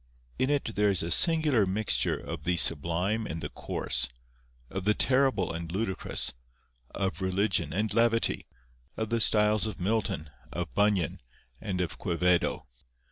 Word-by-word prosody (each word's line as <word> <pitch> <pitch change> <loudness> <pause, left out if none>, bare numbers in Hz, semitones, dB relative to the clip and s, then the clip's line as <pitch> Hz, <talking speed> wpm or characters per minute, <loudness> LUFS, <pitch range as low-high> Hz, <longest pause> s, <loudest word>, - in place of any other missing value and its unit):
In 130 - +2
it 140 -6 -1
there 105 0 +3
is 95 -4 +1
a 85 - -3
singular 150 - +3
mixture 95 - +1
of 75 - -7
the 90 +1 +1
sublime 85 +8 +1
and 80 - -4
the 75 - -5
coarse, 60 - -1 0.6
of 95 +8 -5
the 105 +2 +3
terrible 130 -9 +2
and 85 0 -5
ludicrous, 95 0 -2 0.6
of 95 -3 -3
religion 95 -4 +1
and 105 +5 -1
levity, 115 0 +2 0.5
of 110 0 -3
the 115 -1 +2
styles 105 0 +4
of 105 - -6
Milton, 90 -6 -1 0.2
of 85 -2 -4
Bunyan, 100 -4 +1 0.4
and 95 -4 -3
of 90 - -3
Quevedo. 90 -1 +1
100 Hz, 145 wpm, -29 LUFS, 85-110 Hz, 0.6 s, styles